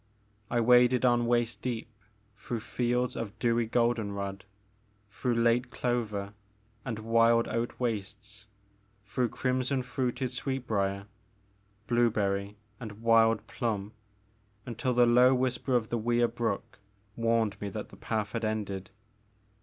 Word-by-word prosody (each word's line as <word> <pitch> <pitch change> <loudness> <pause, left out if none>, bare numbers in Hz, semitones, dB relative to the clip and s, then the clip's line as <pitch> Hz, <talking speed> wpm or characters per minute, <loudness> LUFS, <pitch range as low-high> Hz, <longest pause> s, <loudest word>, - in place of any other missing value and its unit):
I 120 - +1
waded 125 +1 +5
on 120 -1 +3
waist 120 -1 +1
deep 115 -2 -4 0.4
through 110 +3 -5
fields 125 +1 -1
of 115 -1 -5
dewy 115 0 +1
golden 115 -3 +1
rod, 100 -1 -5 0.7
through 120 +4 -1
late 115 +2 +2
clover 110 -6 -2 0.5
and 115 -4 -4
wild 115 +1 +3
oat 115 +1 -3
wastes, 105 -2 -4 0.6
through 115 +4 -1
crimson 130 +2 -1
fruited 125 0 -2
sweetbrier, 110 -7 -2 0.8
blue 120 +2 +3
berry, 100 -1 -1 0.2
and 110 -2 -9
wild 115 -1 +4
plum, 105 -4 -3 0.7
until 125 +1 -2
the 120 0 +6
low 125 +2 +6
whisper 125 0 0
of 115 -2 +1
the 120 - -1
Wier 120 +1 +2
Brook 115 -4 -3 0.4
warned 115 -3 0
me 100 - -3
that - - -6
the - - -13
path 110 -2 -2
had 115 0 -3
ended. 100 -3 -3
115 Hz, 130 wpm, -29 LUFS, 105-120 Hz, 0.8 s, the